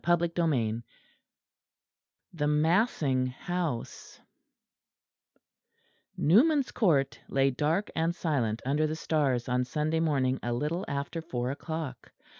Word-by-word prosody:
CHAPTER 170 0 +2 0.2
VIII 115 -6 0 1.5
THE 150 -3 -1
MASSING 150 - +2
HOUSE 155 -1 -4 2.0
Newman's 270 - +4
Court 155 - +2
lay 135 0 +2
dark 155 +10 0
and 165 +1 0
silent 125 -11 -1
under 150 +3 +1
the 155 - -3
stars 145 -7 0
on 125 0 +1
Sunday 150 +5 -1
morning 135 -5 +1
a 120 - -2
little 150 +9 -2
after 140 +3 -3
four 125 -5 -3
o'clock. 150 -3 -6
150 Hz, 105 wpm, -29 LUFS, 130-165 Hz, 2.0 s, Newman's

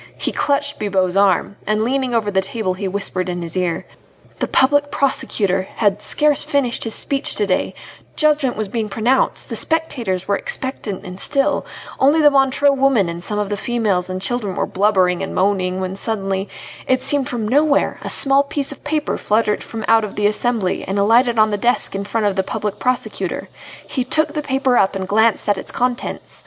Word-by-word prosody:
He - - -2
clutched 285 0 -1
Bibot's 190 -3 0
arm, 195 0 +2
and 215 +1 +1
leaning 255 0 0
over 215 -3 0
the 190 -1 +2
table 205 -3 -3
he 195 +1 -4
whispered 185 -1 -2
in 175 -1 -3
his 165 0 -5
ear: 180 -2 -1 0.5
"The - - -1
Public 285 +2 +3
Prosecutor 195 -9 0
had 205 -2 +1
scarce 295 +3 +2
finished 255 -5 +1
his 225 - -1
speech 275 0 0
to 210 - +1
day, 185 -2 -1 0.4
judgment 300 -6 +2
was 215 -1 -2
being 220 +1 -3
pronounced, 235 +6 0
the - - -4
spectators 245 - -1
were 200 - +2
expectant 220 -5 -3
and 185 +1 -8
still, 275 +4 +1 0.3
only 285 +4 +4
the 295 -1 +6
Montreux 275 +1 +3
woman 270 -9 +2
and 170 +1 -6
some 210 +3 -3
of 205 -1 -1
the 205 - -1
females 205 -5 -1
and 185 0 -3
children 205 -2 -2
were - - 0
blubbering 185 -3 +1
and - - -5
moaning, 185 -1 0
when 185 0 -3
suddenly, 195 -2 -3 0.4
it 260 0 +1
seemed 285 -3 +1
from 230 -4 -3
nowhere, 285 +4 +2
a - - -5
small 275 0 +5
piece 280 0 -3
of 280 - -11
paper 300 0 -2
fluttered 210 0 +1
from 220 -2 -6
out 225 -2 +2
the 210 - -1
assembly 210 -2 0
and 195 +2 -3
alighted 230 +4 +3
on 215 0 +4
the 205 - 0
desk 240 +4 0
in 200 0 -4
front 215 +1 -1
of 200 -2 +1
the 190 - +2
Public 205 +1 -4
Prosecutor. 255 0 -2 0.4
He 260 - -2
took 310 +4 0
the 305 - -2
paper 265 -3 +1
up 195 - +2
and 190 -1 -4
glanced 220 +2 +2
at 205 -1 +1
its - - -7
contents. 245 0 -3
220 Hz, 195 wpm, -19 LUFS, 195-265 Hz, 0.5 s, the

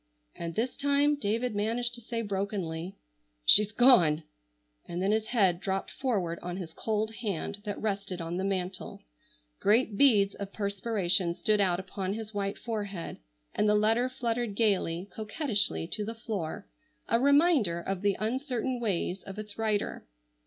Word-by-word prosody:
And 170 -1 -6
this 240 +3 -1
time 285 +1 +3
David 235 -3 -1
managed 230 +4 0
to 240 - -6
say 230 0 -3
brokenly: 190 -4 -3 0.5
"She's 210 - +7
gone!" 180 - +5 0.6
and 175 - -4
then 195 +2 +1
his 220 0 +1
head 195 -8 +3
dropped 190 0 -2
forward 190 -11 -1
on 180 0 -5
his 170 -4 -7
cold 220 +2 -1
hand 205 -1 -3
that 205 -1 -3
rested 200 -3 -2
on 170 +1 -3
the 190 - -1
mantel. 185 -1 -3 0.6
Great 215 0 +2
beads 210 -8 +5
of 200 -1 -7
perspiration 200 -4 +1
stood 210 +3 +2
out 180 -3 +2
upon 190 +1 -4
his 220 0 -6
white 200 -1 -2
forehead, 205 -6 -4 0.4
and 210 - +2
the 210 - +4
letter 225 +4 +3
fluttered 235 -3 -2
gayly, 195 -5 +1
coquettishly 215 - 0
to 210 - -2
the 225 +2 -5
floor, 205 -4 -4 0.4
a 230 - +3
reminder 280 - +4
of 190 +1 -3
the 200 -1 +1
uncertain 250 +2 -1
ways 195 -4 -1
of 195 0 -9
its 210 0 -7
writer. 215 - -1
205 Hz, 155 wpm, -29 LUFS, 190-230 Hz, 0.6 s, She's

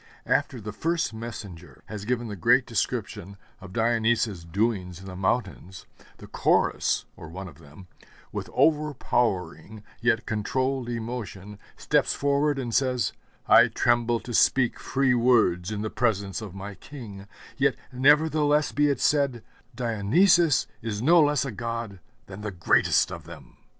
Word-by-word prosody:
After 125 - 0
the 105 0 -6
First 165 0 -1
Messenger 100 - -9
has 105 -1 -7
given 120 0 -1
the 105 - -6
great 85 - +3
description 100 +3 -3 0.2
of 95 -2 -11
Dionysus's 115 -3 +1
doings 90 -1 -2
in 95 - -12
the 95 -1 -8
mountains, 95 -2 -3 0.3
the - - -12
Chorus, - - +1
or 80 - -11
one 95 +3 -7
of 85 - -14
them, 75 +4 -15 0.5
with - - -5
overpowering 120 - 0 0.2
yet 115 -1 +1
controlled 130 +4 -2
emotion, 110 -4 -6 0.2
steps - - +1
forward 140 +1 +1
and 120 -4 -4
says, 125 -6 +1 0.3
'I - - +7
tremble 120 -1 +2
to 120 - -8
speak 125 +2 +3
free 135 -1 +1
words 115 -8 +3
in 105 -1 -4
the 110 - -4
presence 100 -5 -1
of 100 -4 -8
my 100 +1 -7
King; 100 -5 -11 0.3
yet - - +2 0.2
nevertheless 150 +2 +3
be 145 0 +2
it 140 - 0
said: 140 -6 +1 0.3
Dionysus 125 - +3 0.2
is 110 -1 -4
no 170 +5 +6
less 145 -1 +2
a 135 - -4
god 115 -2 -5 0.3
than 100 +1 -10
the 105 - -4
greatest 90 -4 +2
of - - -8
them!' - - -13
115 Hz, 145 wpm, -26 LUFS, 100-130 Hz, 0.5 s, I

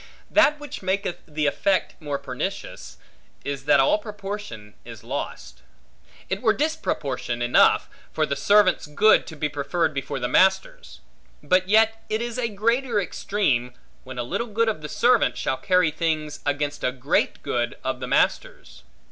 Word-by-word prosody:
That 300 -1 +4
which 295 -2 -8
maketh 190 -1 -2
the 150 -1 -2
effect 190 +6 +1
more 145 -2 -3
pernicious, - - -6 0.5
is 140 -1 -4
that 145 - +5
all 135 +10 +3
proportion 200 - -7
is - - -11
lost. - - -6 0.7
It 190 +1 -3
were 220 -3 +3
disproportion 150 - -2
enough, 120 0 +4 0.2
for 155 - 0
the 140 - -2
servant's 205 -3 +3
good 205 +9 +4
to 160 - -8
be 150 0 -1
preferred 155 +3 -1
before 135 0 -4
the 125 - -1
master's; 190 - +1 0.4
but 185 0 +2
yet 225 +1 +3
it 215 - 0
is 235 +1 -4
a 235 -2 0
greater 230 +3 0
extreme, 135 - -1 0.3
when 130 -1 -9
a 120 - -1
little 230 - -3
good 225 +1 +1
of 210 -8 -3
the 150 - -7
servant, 240 +5 +2
shall 130 - -1
carry 180 +3 +2
things 155 -2 -2
against 145 0 -2
a 125 - +1
great 130 +2 -1
good 120 -1 -1
of 130 -1 -2
the 125 - -5
master's. - - -1
175 Hz, 160 wpm, -24 LUFS, 140-215 Hz, 0.7 s, that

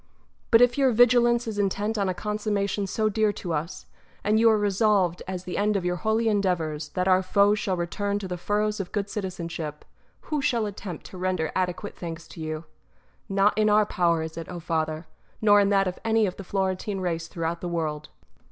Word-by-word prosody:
But 230 0 +6
if 245 +2 +2
your 270 -1 +5
vigilance 240 0 +4
is 215 -2 -3
intent 205 +2 0
on 200 -3 0
a 185 - -2
consummation 205 -1 -1
so 215 +3 0
dear 215 0 +2
to 175 -4 -4
us, 160 +3 -4 0.4
and 215 +1 +3
you 230 0 +6
are 220 - +4
resolved, 200 -3 +2
as 185 -1 -4
the 185 - -5
end 210 +1 +2
of 190 -3 -1
your 180 0 0
holy 220 +3 +1
endeavours, 170 -8 0
that 180 0 0
our 185 0 +5
foes 200 +2 +3
shall 190 -5 -1
return 200 +4 -2
to 200 -2 -5
the 180 - -3
furrows 210 +4 -1
of 195 - -4
good 205 -1 -2
citizenship, 170 -6 -5 0.4
who 300 -3 -2
shall 240 -5 +1
attempt 195 -5 -7
to 185 - -10
render 185 -3 -1
adequate 185 +2 -2
thanks 165 -1 -7
to 165 - -10
you? 155 0 -4 0.7
Not 200 +1 +3
in 215 0 +3
our 210 0 +5
power 170 -4 +1
is 160 0 -7
it, 165 - -6
O 175 - -6
Father, 160 -1 -2 0.3
nor 205 -1 +6
in 200 -1 +3
that 195 -1 +3
of 180 - -4
any 225 -1 +3
of 185 - -3
the 195 - -8
Florentine 190 +1 -2
race 170 -3 -2
throughout 165 +1 -3
the 175 - -3
world. 155 -3 -3
195 Hz, 205 wpm, -26 LUFS, 175-210 Hz, 0.7 s, But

